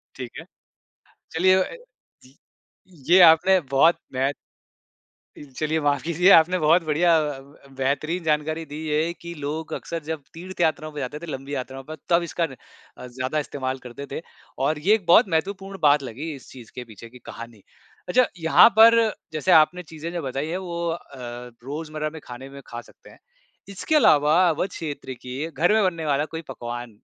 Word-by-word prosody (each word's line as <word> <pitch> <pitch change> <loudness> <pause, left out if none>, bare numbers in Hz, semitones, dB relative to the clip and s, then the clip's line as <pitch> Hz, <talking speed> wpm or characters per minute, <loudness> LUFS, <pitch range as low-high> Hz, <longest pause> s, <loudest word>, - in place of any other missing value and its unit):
ठीक 125 -3 -7
है। - - -11 0.9
चलिए 185 +3 +4
अ, 185 - -6 0.5
ज 130 +1 -20 0.8
ये 185 +2 +7
आपने 185 +4 +5
बहुत 140 +6 +4 0.2
महत् 135 +2 0 1.0
इल 145 - -12
चलिए 155 +4 -1
माफ़ 145 -3 +1
कीजिए 170 +3 +2
आपने 170 +2 +6
बहुत 165 +2 +4
बढ़िया 165 +2 +3
अ, 150 -3 -2 0.3
ब 135 - -19
बेहतरीन 155 +6 -1
जानकारी 155 +1 -1
दी 150 -1 -9
है 155 +2 0
कि 170 -1 -9
लोग 155 +2 -5
अक्सर 165 -2 -5
जब 160 0 -5
तीर्थ 180 +2 -7
यात्राओं 155 -1 0
पे 150 - -7
जाते 140 +2 -5
थे, 170 - -8
लंबी 140 -2 -6
यात्राओं 135 0 -6
पर, 155 +3 -8
तब 170 0 +3
इसका 170 +1 -1
न - - -10 0.4
अ, 125 - -9
ज़्यादा 130 +4 -3
इस्तेमाल 130 -2 -4
करते 125 +4 -8
थे 140 - -4 0.5
और 150 +1 -1
ये 195 +8 +3
एक 205 -5 -6
बहुत 175 +7 +6
महत्वपूर्ण 195 +4 -2
बात 145 -1 +5
लगी, 135 +6 -6
इस 135 - -14
चीज़ 120 -4 -13
के 125 - -6
पीछे 115 -1 -13
की 125 +2 -15
कहानी। 115 -2 -10 0.5
अच्छा 255 +7 +4
यहाँ 165 +6 +7
पर 230 +1 +8 0.3
जैसे 155 +4 0
आपने 175 +2 +5
चीज़ें 160 +1 -8
जो 175 - -3
बताई 135 +1 -3
हैं, 170 +3 -3
वो 170 -2 -4
अ, 165 - -2 0.7
रोज़मर्रा 155 +2 -4
में 160 0 -11
खाने 125 +2 -9
में 140 0 -11
खा 120 0 -7
सकते - - -19
हैं। - - -18 0.5
इसके 200 +10 -2
अलावा 150 - +5
अवध 165 +4 -1
क्षेत्र 145 -6 -6
के, 130 +6 -5
घर 175 +5 +2
में 220 -1 +3
बनने 170 -4 -1
वाला 145 0 +1
कोई 160 - -4
पकवान 120 -3 -7
155 Hz, 185 wpm, -24 LUFS, 135-170 Hz, 1.0 s, पर